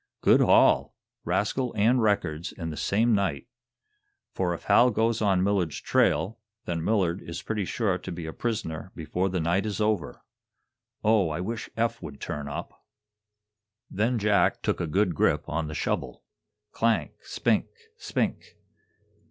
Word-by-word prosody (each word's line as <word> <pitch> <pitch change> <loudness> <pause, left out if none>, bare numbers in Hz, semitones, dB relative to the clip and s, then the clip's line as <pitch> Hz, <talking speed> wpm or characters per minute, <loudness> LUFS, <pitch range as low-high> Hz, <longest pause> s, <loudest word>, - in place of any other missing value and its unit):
Good - - +5
haul - - +4 0.3
rascal 125 +4 -1
and 120 +4 +4
records 85 -7 0
in 80 -2 -6
the - - -6
same 110 +8 +2
night. 95 -9 0 0.9
For, 90 -2 0
if - - -11
Hal 120 +5 +5
goes 115 0 0
on 95 -3 +2
Millard's 95 -6 0
trail, 110 +4 +1 0.3
then 85 -2 -2
Millard 95 -4 +1
is 85 0 -7
pretty 105 -3 -2
sure 95 -3 -1
to - - -7
be 85 -1 -6
a 80 - -6
prisoner 95 -7 -3
before 90 +4 -2
the 95 0 -1
night 90 +6 +1
is 105 -1 -3
over. 105 -1 -1 0.8
Oh, 105 -5 +3
I 75 +1 -3
wish 115 +5 -4
Eph 115 +1 0
would 75 -5 -8
turn 75 -1 -5
up." 75 +4 -7 1.1
Then 115 +5 +1
Jack 105 -1 +2
took - - 0
a 85 - -1
good 95 +3 +1
grip - - +1
on 80 0 -2
the 75 - -6
shovel. - - -3 0.5
Clank! 115 -1 +1
spink! - - 0 0.3
spink! - - -3
95 Hz, 150 wpm, -27 LUFS, 85-110 Hz, 1.1 s, Good